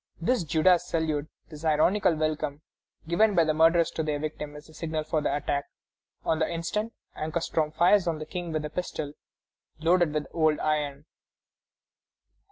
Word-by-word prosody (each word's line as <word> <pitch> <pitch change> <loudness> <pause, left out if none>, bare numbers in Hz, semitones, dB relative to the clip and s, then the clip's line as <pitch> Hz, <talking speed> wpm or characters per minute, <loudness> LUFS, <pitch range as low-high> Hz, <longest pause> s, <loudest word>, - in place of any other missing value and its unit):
This 195 +4 +1
Judas 170 +3 +3
salute, 155 -3 -1 0.2
this 155 -1 -10
ironical 170 +4 +3
welcome 155 -1 -2 0.4
given 200 +5 +3
by 170 - +5
the 155 -1 +1
murderers 165 +2 +4
to - - -2
their 150 -2 -1
victim, 150 0 -5
is 150 0 -10
the 160 - -16
signal 155 -1 -3
for 155 0 -1
the - - 0
attack. 145 -1 -1 0.6
On 160 - +1
the 160 - 0
instant, 210 +7 -2 0.2
Ankarstroem 155 0 -1
fires 175 +4 +4
on 165 -2 0
the 155 - -6
King 175 +1 -5
with 155 -1 -2
a 150 - -5
pistol 155 -5 -4 0.7
loaded 170 0 +3
with 150 -1 -1
old 155 -2 +3
iron. 150 -2 -1
155 Hz, 165 wpm, -27 LUFS, 150-170 Hz, 0.7 s, by